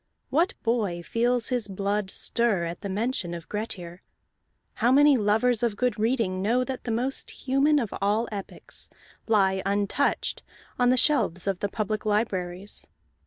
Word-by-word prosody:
What 340 +6 +2
boy 210 -8 0
feels 240 +3 +1
his 245 -5 0
blood 200 +1 -2
stir 220 -3 0
at 170 +1 -6
the 200 - -4
mention 200 -3 -1
of 170 -1 -9
Grettir? 185 -5 -5 0.8
How 240 +2 +4
many 290 +1 +6
lovers 225 +1 +2
of 235 -3 +1
good 250 -4 0
reading 220 -5 0
know 235 +6 +2
that 260 0 -5
the - - -3
most 245 +4 -1
human 275 +3 +2
of 235 -8 -1
all 210 +4 +1
epics 200 -2 -6 0.4
lie 190 -4 +3
untouched 205 +7 0 0.4
on 245 0 +4
the 255 - +4
shelves 230 - +3
of 195 -2 -1
the 205 - -1
public 215 +1 -2
libraries? 200 -3 -2
215 Hz, 155 wpm, -26 LUFS, 195-245 Hz, 0.8 s, many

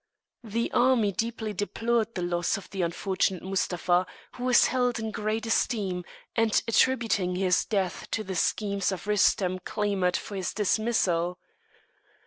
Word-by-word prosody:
The 230 +1 -2
army 240 -4 +3
deeply 220 +1 -3
deplored 225 +3 -1
the 180 - -2
loss 175 +1 0
of 200 - -10
the 195 - -3
unfortunate 185 +1 -1
Mustapha, 180 -1 0 0.2
who 250 - -6
was 250 -1 +6
held 250 -2 +1
in 220 -1 -3
great 215 +1 -2
esteem, 195 -5 0 0.3
and 225 -2 +3
attributing 225 -6 +2
his 180 -1 +2
death 190 -5 -2
to 220 - -2
the 190 - -5
schemes 200 +2 0
of 180 -1 -5
Rustem 190 -3 +2
clamoured 200 -4 0
for 205 - -7
his 185 - -3
dismissal. 190 -5 +1
205 Hz, 140 wpm, -27 LUFS, 185-225 Hz, 0.3 s, was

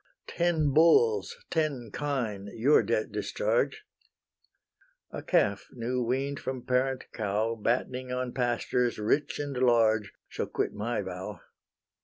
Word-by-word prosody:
Ten 160 -5 +1
bulls, 435 - +4
ten 140 -8 -1
kine, 115 -9 -2
your 130 +7 +5
debt 110 -2 -1
discharge: 105 0 -1 1.3
A - - -5
calf 100 -1 +1
new 125 +1 -2
wean'd 135 +4 -1
from 130 -2 -5
parent 130 +1 +1
cow, 110 +1 -1
Battening 125 +3 -1
on 125 -1 -2
pastures 120 -1 0
rich 110 +8 0
and 145 -2 -4
large, 115 -4 +3 0.2
Shall - - -4
quit - - -2
my 110 0 -2
vow. 95 +1 -6
125 Hz, 120 wpm, -29 LUFS, 110-140 Hz, 1.3 s, your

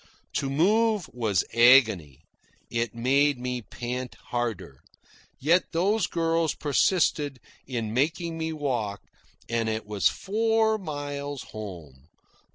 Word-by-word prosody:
To 135 - -1
move 205 +5 +2
was 110 -7 +1
agony. 115 - +5 0.5
It 115 -1 -1
made 140 +4 +2
me 125 0 -3
pant 125 +3 -5
harder. 115 - -3 0.6
Yet 170 +6 +3
those 195 +5 +2
girls 165 -1 0
persisted 145 -2 +1 0.3
in 115 -4 -3
making 165 +6 0
me 160 0 -3
walk, 120 -10 -2 0.5
and 115 -1 0
it 110 -1 -3
was 100 -6 +2
four 220 +1 +1
miles 145 -4 -5
home. 85 -10 -9
135 Hz, 110 wpm, -26 LUFS, 115-165 Hz, 0.6 s, agony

